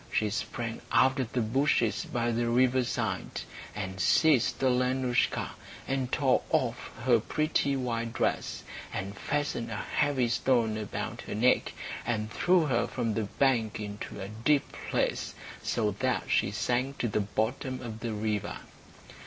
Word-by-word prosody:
She 105 -1 +1
sprang 115 +1 -3
out 130 +1 +4
of 125 -3 -2
the 125 - +1
bushes 120 -1 +2
by 120 0 0
the 120 +1 0
riverside, 125 0 +1 0.3
and 95 -2 -4
seized 150 - +4
Alenoushka, 125 0 +2 0.4
and 135 -1 -1
tore 135 -3 +3
off 120 -1 0
her 120 -2 +5
pretty 145 +3 +1
white 115 -3 -2
dress, - - -1 0.3
and 100 +2 -4
fastened 145 -1 -2
a 110 - -4
heavy 135 +2 +1
stone 115 -2 +2
about 110 -2 -4
her - - -3
neck, 125 +4 +3 0.3
and 110 -2 -2
threw 175 - +3
her 130 -5 +1
from 115 -2 -1
the 110 0 -1
bank 115 -2 +1
into 105 0 -6
a 95 - -4
deep 125 +7 +1 0.2
place, - - 0 0.3
so 105 -3 0
that 130 -2 +1
she - - +3
sank 130 +3 -1
to 120 - 0
the 105 - 0
bottom 115 +6 -1
of 110 -2 -6
the 115 -1 -3
river. 105 -1 -2
120 Hz, 145 wpm, -29 LUFS, 110-130 Hz, 0.4 s, her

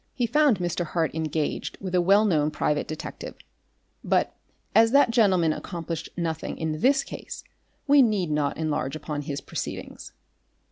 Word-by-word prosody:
He 245 - +1
found 295 -2 +3
Mr. 175 -1 -2
Hart 165 -1 -1
engaged 155 -1 -2
with 185 -2 -6
a 180 - +4
well 200 +4 +4
known 155 -7 +2
private 150 -1 -1
detective, 155 - -7 0.7
but - - +1 0.4
as 225 +2 +5
that 280 -4 +5
gentleman 185 -8 +3
accomplished 165 -3 -5
nothing 165 -2 -3
in 155 -1 -3
this 275 +1 +4
case, - - -8 0.4
we 285 -1 +6
need 205 -9 +1
not 150 -1 0
enlarge 155 -3 -2
upon 150 -1 -4
his 145 -1 -5
proceedings. - - -6
170 Hz, 150 wpm, -25 LUFS, 155-215 Hz, 0.7 s, we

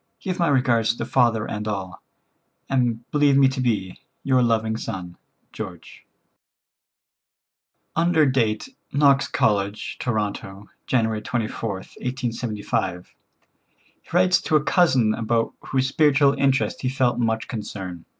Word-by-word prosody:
Give 185 -1 -4
my 170 - +3
regards 120 -5 +2
to - - -4
father 120 -4 +2
and 105 0 -4
all, 95 -4 -4 0.7
and 120 -3 0
believe 145 -2 +4
me 135 -1 +6
to 130 0 -3
be, 105 -7 -1 0.2
"Your 130 -2 +3
loving 110 -2 +1
son, 90 -5 -6 0.4
"George." - - -9 1.9
Under 165 -1 +3
date 125 - 0 0.2
"Knox 140 -1 +4
College, 100 0 -1
Toronto, 100 -3 -3 0.2
January 110 -3 +1
24th, 110 -4 -4
1875," 115 -8 -3 0.9
he - - -25
writes 180 +1 +4
to 155 - 0
a 150 - +4
cousin 130 -12 +3
about 115 +1 0
whose 130 0 0
spiritual 140 -1 +4
interest 140 0 +1
he 130 - 0
felt 125 -2 +1
much 110 -1 0
concern. 95 -6 -6
120 Hz, 120 wpm, -23 LUFS, 110-135 Hz, 1.9 s, me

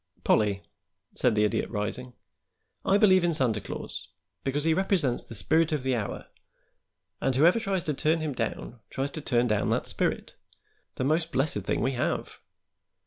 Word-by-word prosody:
"Pollie," 100 -2 +2 0.5
said 120 -3 +2
the 105 - +3
Idiot, 105 - 0
rising, 120 +4 -3 0.7
"I 195 - +4
believe 185 -4 +5
in 170 -2 +2
Santa 115 -7 +1
Claus - - -7 0.4
because 140 +2 0
he 160 0 +4
represents 175 -8 +1
the 115 - -11
spirit 160 +9 +2
of 150 -4 -1
the 130 -1 +1
hour, 110 -4 -4 1.0
and 135 -1 +1
whoever 170 - +5
tries 195 -5 -1
to 150 - -1
turn 155 +4 +1
him 155 -2 -2
down 120 0 -4
tries 135 +1 -3
to 155 - -6
turn 120 -3 +1
down 105 -4 +1
that - - 0
spirit - - -1 0.6
the - - -2
most 160 +4 +1
blessed 135 -6 +1
thing - - 0
we 130 - +1
have. 125 -1 -2
135 Hz, 170 wpm, -27 LUFS, 120-160 Hz, 1.0 s, believe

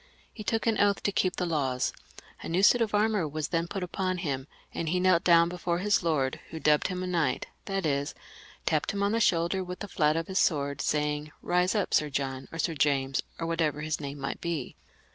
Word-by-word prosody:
He 215 - -8
took 225 +1 -1
an 225 -2 +2
oath 205 -1 +3
to 200 - +1
keep 185 -1 +1
the 180 - -1
laws; 135 -6 0 0.5
a - - -6
new 180 +4 +1
suit 240 +4 +6
of 215 -2 +1
armour 210 -5 +2
was 150 0 -3
then 165 0 0
put 195 +1 -4
upon 185 +1 -2
him, 140 -6 -3 0.3
and 165 - -2
he 180 +2 +1
knelt 180 -2 +4
down 170 -1 +6
before 175 0 -2
his 205 +3 +2
lord, 150 -6 0
who 160 - -6
dubbed 150 -1 +3
him 185 -1 -3
a - - -2
knight; 175 -4 0 0.2
that 195 -2 -2
is, 140 -1 -1 0.5
tapped 155 +2 +1
him 200 0 -1
on 200 - +2
the 230 - +1
shoulder 175 -2 +2
with 180 0 -6
the 205 - -6
flat 155 -4 +2
of 165 - -1
his 190 +2 -1
sword, 140 -3 +1
saying, 150 0 -1 0.2
Eise 180 +3 +2
up, 205 - 0
Sir 150 - +3
John, 135 -1 -3
or 165 - -7
Sir 165 +1 0
James, 135 -2 +1 0.2
or 165 - -3
whatever 160 -3 0
his 155 0 -2
name 140 0 -5
might 140 - -4
be. 165 -6 -3
170 Hz, 225 wpm, -28 LUFS, 150-185 Hz, 0.5 s, suit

